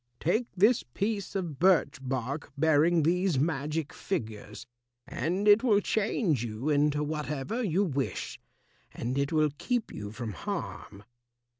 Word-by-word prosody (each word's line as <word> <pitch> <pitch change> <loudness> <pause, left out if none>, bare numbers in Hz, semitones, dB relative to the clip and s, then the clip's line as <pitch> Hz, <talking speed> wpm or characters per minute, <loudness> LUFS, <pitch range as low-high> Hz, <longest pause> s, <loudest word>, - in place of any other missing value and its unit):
Take 220 +9 +1
this 220 +6 +5
piece 200 -1 -2
of 170 -8 -3
birch 175 -7 +3
bark 135 +2 -3
bearing 160 +2 +4
these 180 0 +2
magic 150 +1 -1
figures, 110 - -5 0.4
and 185 +5 -2
it 205 +2 +7
will 220 -6 +4
change 200 - 0
you 115 +5 -3
into 150 0 +2
whatever 150 - -3
you 195 -3 +1
wish, 140 -7 -3 0.5
and 120 +3 -3
it 140 0 0
will 155 -2 +3
keep 245 -3 -1
you 105 -1 -6
from 115 -1 -5
harm." 100 +1 -6
155 Hz, 135 wpm, -29 LUFS, 135-195 Hz, 0.5 s, it